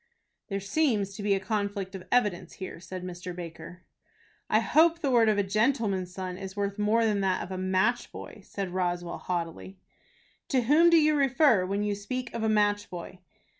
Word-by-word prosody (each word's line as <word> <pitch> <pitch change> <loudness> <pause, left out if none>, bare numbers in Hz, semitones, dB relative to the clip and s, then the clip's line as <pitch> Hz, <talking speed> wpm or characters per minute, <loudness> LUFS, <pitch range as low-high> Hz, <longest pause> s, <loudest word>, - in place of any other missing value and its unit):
"There 195 -2 -2
seems 205 -2 0
to 205 - -7
be 200 -1 +2
a - - -1
conflict 200 -1 -3
of 190 -2 -9
evidence 205 -8 +1
here," 185 -3 -7
said 180 +1 -7
Mr. 180 0 -6
Baker. 170 +1 -9 0.7
"I - - +4
hope 330 +2 +4
the 290 -5 -1
word 230 -3 +5
of 210 - +2
a 205 - +2
gentleman's 210 -3 0
son 185 0 -5
is 190 -1 -7
worth 200 0 -2
more 220 +2 +3
than 210 -2 +1
that 190 -1 0
of 180 - -9
a 185 - -3
match 190 +6 +1
boy," 210 - -10
said 195 -2 -5
Roswell, 175 -1 -2
haughtily. 175 +2 -4 0.7
"To 260 -3 +2
whom 305 +8 +5
do 335 - +6
you 305 -1 +4
refer, 270 -8 +3
when 200 +2 -1
you 210 0 0
speak 240 +5 -5
of 230 - -3
a 220 - +1
match 205 -1 +2
boy?" 180 +1 -8
200 Hz, 195 wpm, -28 LUFS, 185-230 Hz, 0.7 s, do